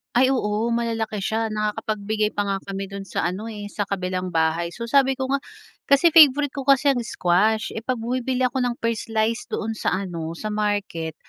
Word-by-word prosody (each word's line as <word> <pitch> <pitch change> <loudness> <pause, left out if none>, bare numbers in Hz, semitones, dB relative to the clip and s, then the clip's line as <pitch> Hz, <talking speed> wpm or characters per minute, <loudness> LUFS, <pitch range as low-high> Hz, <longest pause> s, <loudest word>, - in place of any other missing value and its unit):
Ay 255 +2 +5
oo 225 -4 0
malalaki 225 -3 -2
siya 225 +1 0
nakakapagbigay 215 0 -2
pa 205 - +1
nga 195 -1 -1
kami 195 0 -4
dun 195 0 -7
sa - - -2
ano, 210 +5 -6
eh, 205 -2 -7
sa 205 -1 -3
kabilang 185 -1 -2
bahay. 165 0 +1
So 235 - -6
sabi 270 +2 +3
ko 265 0 -3
nga 275 - +2 0.5
kasi 280 +5 +5
favorite 290 -3 +6
ko 275 -1 -6
kasi 275 +1 +5
ang 250 - 0
squash, 215 0 +1
eh, - - -4
pag 255 +3 -2
bumibili 250 +2 -2
ako 255 +1 +1
ng 245 -1 0
per 230 -1 -1
slice 225 +1 -1
doon 225 +1 -3
sa 220 - -1
ano 165 -2 -5
sa 215 +4 -5
market, 205 -7 -2
220 Hz, 195 wpm, -23 LUFS, 200-250 Hz, 0.5 s, favorite